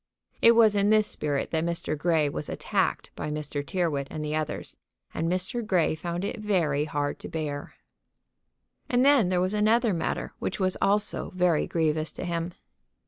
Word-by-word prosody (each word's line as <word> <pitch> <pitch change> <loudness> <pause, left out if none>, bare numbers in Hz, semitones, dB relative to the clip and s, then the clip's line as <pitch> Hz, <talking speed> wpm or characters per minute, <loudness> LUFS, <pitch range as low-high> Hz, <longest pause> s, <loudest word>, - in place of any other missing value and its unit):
It 230 - +8
was 225 -2 +5
in 200 0 +3
this 215 0 +5
spirit 145 -7 -2
that 160 -1 0
Mr. 170 -2 -2
Grey 155 0 +2
was 145 +1 -4
attacked - - -1
by - - -4
Mr. 150 -1 -3
Tyrrwhit 145 -3 -1
and 155 -1 -5
the 150 +1 -2
others; 155 -1 -4 0.4
and 165 +1 -1
Mr. 185 +6 0
Grey 185 -8 +2
found 170 +3 -3
it 230 - -4
very 165 -9 +1
hard 145 -1 -2
to - - -8
bear. 150 -3 -4 1.1
And 250 +1 +3
then 275 -10 +5
there 180 -1 +1
was 185 +2 0
another 220 +1 +3
matter 165 - -2
which 190 - -3
was 185 -1 +1
also 205 +1 +1
very 180 -3 +2
grievous 160 -1 0
to - - -6
him. 170 0 -2
170 Hz, 175 wpm, -27 LUFS, 155-205 Hz, 1.1 s, It